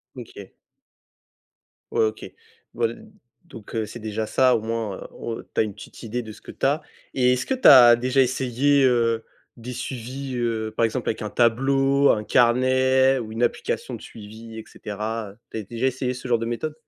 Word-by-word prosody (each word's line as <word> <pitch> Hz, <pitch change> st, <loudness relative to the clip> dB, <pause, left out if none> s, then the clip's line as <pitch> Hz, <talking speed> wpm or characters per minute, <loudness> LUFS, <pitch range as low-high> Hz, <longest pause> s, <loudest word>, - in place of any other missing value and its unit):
OK. -, -, -11 dB, 1.4 s
Ouais, 450 Hz, -, +2 dB
OK. 430 Hz, -, -4 dB, 0.5 s
Voil 225 Hz, -, -3 dB, 0.4 s
donc 115 Hz, -8 st, -11 dB
heu, 110 Hz, -1 st, -1 dB
c'est 120 Hz, +3 st, -9 dB
déjà 110 Hz, 0 st, -3 dB
ça, 130 Hz, +3 st, +3 dB
au 110 Hz, -, -1 dB
moins, 110 Hz, -3 st, -3 dB
heu, -, -, -9 dB
o 115 Hz, -1 st, -6 dB
tu -, -, -34 dB
as -, -, +5 dB
une 105 Hz, -2 st, -5 dB
petite -, -, -12 dB
idée 120 Hz, +2 st, -3 dB
de 110 Hz, -, -9 dB
ce -, -, -14 dB
que -, -, -10 dB
tu -, -, -3 dB
as. 145 Hz, +3 st, +2 dB, 0.3 s
Et 125 Hz, -1 st, +3 dB
est-ce 125 Hz, -, -2 dB
que 265 Hz, -, -1 dB
tu 260 Hz, -, +3 dB
as 120 Hz, -4 st, +9 dB
déjà 130 Hz, +2 st, +2 dB
essayé, 130 Hz, +2 st, +2 dB
heu, 115 Hz, -2 st, +1 dB, 0.3 s
des 125 Hz, +2 st, -7 dB
suivis, 130 Hz, +2 st, -6 dB
heu, 110 Hz, -2 st, -2 dB
par 115 Hz, -, +3 dB
exemple 120 Hz, +2 st, -2 dB
avec 110 Hz, -, -3 dB
un 105 Hz, -, -4 dB
tableau, 135 Hz, +4 st, +2 dB
un 105 Hz, -, +2 dB
carnet 130 Hz, +3 st, +3 dB
ou 110 Hz, -2 st, -7 dB
une 120 Hz, +2 st, -1 dB
application -, -, -2 dB
de -, -, -11 dB
suivi, 110 Hz, +1 st, -11 dB
et 110 Hz, -, -7 dB
cetera, 105 Hz, 0 st, -5 dB
heu, 105 Hz, -, -20 dB
tu -, -, -5 dB
as 110 Hz, -, -4 dB
déjà 120 Hz, +5 st, -2 dB
essayé 130 Hz, 0 st, -2 dB
ce 125 Hz, 0 st, -8 dB
genre 120 Hz, -2 st, +2 dB
de 115 Hz, -, -3 dB
méthode? 120 Hz, +6 st, -3 dB
120 Hz, 205 wpm, -23 LUFS, 110-130 Hz, 1.4 s, as